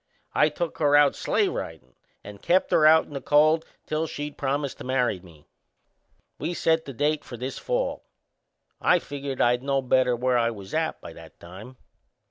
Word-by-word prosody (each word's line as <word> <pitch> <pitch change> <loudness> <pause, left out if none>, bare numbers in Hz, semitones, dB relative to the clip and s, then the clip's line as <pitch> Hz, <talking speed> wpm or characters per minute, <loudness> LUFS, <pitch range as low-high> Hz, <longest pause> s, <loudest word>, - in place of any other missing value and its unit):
I 150 - +4
took 165 +2 -5
her 145 -2 +3
out 145 -1 +5
sleigh - - +1
ridin' 65 -7 -6 0.3
and 100 0 -11
kept 185 +2 +2
her 155 - +5
out 160 +1 +6
in - - -14
the 140 - -5
cold 155 +2 +3 0.2
till 155 +1 -2
she'd 145 -1 -6
promised 140 0 -2
to - - -7
marry 125 -6 0
me. 85 -5 -18 0.9
We 175 - -3
set 160 0 +1
the 135 - -7
date 150 +4 0
for 120 - -9
this 130 +3 -5
fall - - -2 0.8
I 180 - +4
figured 140 -4 -6
I'd 120 +1 +3
know 135 0 0
better 125 -1 +2
where 125 0 +1
I 115 0 +2
was 100 -4 -9
at - - -1
by - - -10
that - - -15
time. 100 +9 -12
135 Hz, 185 wpm, -25 LUFS, 120-155 Hz, 0.9 s, out